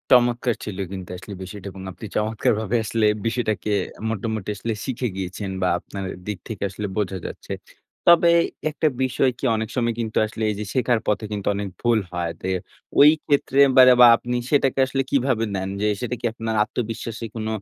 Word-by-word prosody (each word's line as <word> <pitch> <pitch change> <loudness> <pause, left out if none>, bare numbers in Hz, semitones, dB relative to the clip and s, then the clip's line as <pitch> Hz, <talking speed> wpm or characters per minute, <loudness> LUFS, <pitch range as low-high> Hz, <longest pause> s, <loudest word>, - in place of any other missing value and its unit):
চমৎকার 120 -1 +2
ছিল 105 -3 -6
কিন্তু 95 -2 -7
আসলে 90 +3 -9
বিষয়টা 100 +1 -8
এবং 95 0 -10
আপনি 90 +4 -10
চমৎকারভাবে 110 0 0
আসলে 110 0 +1 0.2
বিষয়টাকে 110 -3 -1 0.4
মোটামুটি 110 -1 -3
আসলে 110 +3 -3
শিখে 130 -1 -2
গিয়েছেন 95 +1 -4
বা 90 - +2
আপনার 100 +1 -7 0.2
দিক 105 -3 -2
থেকে 110 -4 -5
আসলে 105 +2 -5
বোঝা 95 -2 -1
যাচ্ছে। - - -6 0.5
তবে 170 0 +7 0.4
একটা 155 +1 0 0.2
বিষয় 130 +1 +2
কি - - -15
অনেক 110 0 -2
সময় 120 -2 +1
কিন্তু 110 -1 -2
আসলে 110 +1 -5
এই 105 - -1
যে 105 - -3
শেখার 120 -2 +2
পথে 105 +1 0
কিন্তু 105 -2 -4
অনেক 100 0 -3
ভুল 120 -2 +3
হয় 85 -1 -2
যে 95 - -3 0.5
ওই 145 +1 +10 0.2
ক্ষেত্রে 140 -1 +1 0.3
যে - - +8
বা - - +11
আপনি 125 +1 -3 0.2
সেটাকে 135 -2 +2
আসলে 135 +1 -1
কিভাবে 130 -4 +2
নেন 95 0 -2
যে 105 - +2
সেটা 125 0 -2
কি - - -3
আপনার 115 0 -3
আত্মবিশ্বাসে 115 0 -4
কোন 110 -1 -3
110 Hz, 180 wpm, -23 LUFS, 100-120 Hz, 0.5 s, বা